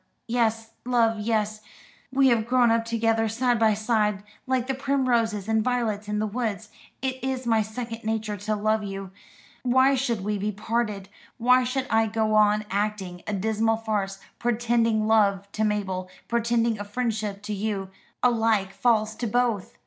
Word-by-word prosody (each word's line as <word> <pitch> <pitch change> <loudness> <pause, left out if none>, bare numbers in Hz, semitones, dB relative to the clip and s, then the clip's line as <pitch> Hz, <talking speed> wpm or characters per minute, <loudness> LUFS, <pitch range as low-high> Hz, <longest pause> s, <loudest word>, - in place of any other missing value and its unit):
Yes, 225 -1 0
love, 230 -3 +2
yes: 215 -1 -1 0.5
we 270 0 +4
have 230 -2 +2
grown 245 -1 +4
up 230 0 +2
together 225 -1 +1
side 240 +1 +1
by 220 -2 +4
side, 210 -2 0 0.2
like 255 -2 +1
the 270 - -1
primroses 245 -6 0
and 220 -1 +2
violets 225 -4 -1
in 210 0 -1
the 215 - 0
woods. 215 -1 -3 0.3
It 260 -1 -3
is 260 -1 -2
my 225 -2 +3
second 225 +1 -6
nature 220 -1 -2
to 210 +2 -2
love 215 +1 +1
you. 195 -1 -6 0.5
Why 260 +2 +4
should 245 -6 -1
we 210 0 -1
be 210 +2 -1
parted? 210 -1 -2 0.3
Why 250 +1 +4
should 255 +1 -1
I 225 0 +3
go 220 0 0
on 210 0 +4
acting 200 -3 -2
a 210 - -2
dismal 220 +3 +1
farce, 205 -3 -2 0.2
pretending 230 -2 +1
love 200 -3 +3
to 215 - -1
Mabel, 190 -3 -1 0.2
pretending 235 -1 +1
a - - -3
friendship 215 -2 -3
to 210 0 -4
you 200 -2 -3 0.3
alike 225 -5 +2
false 220 -3 +2
to 240 - -2
both? 235 -3 0
220 Hz, 165 wpm, -25 LUFS, 210-235 Hz, 0.5 s, we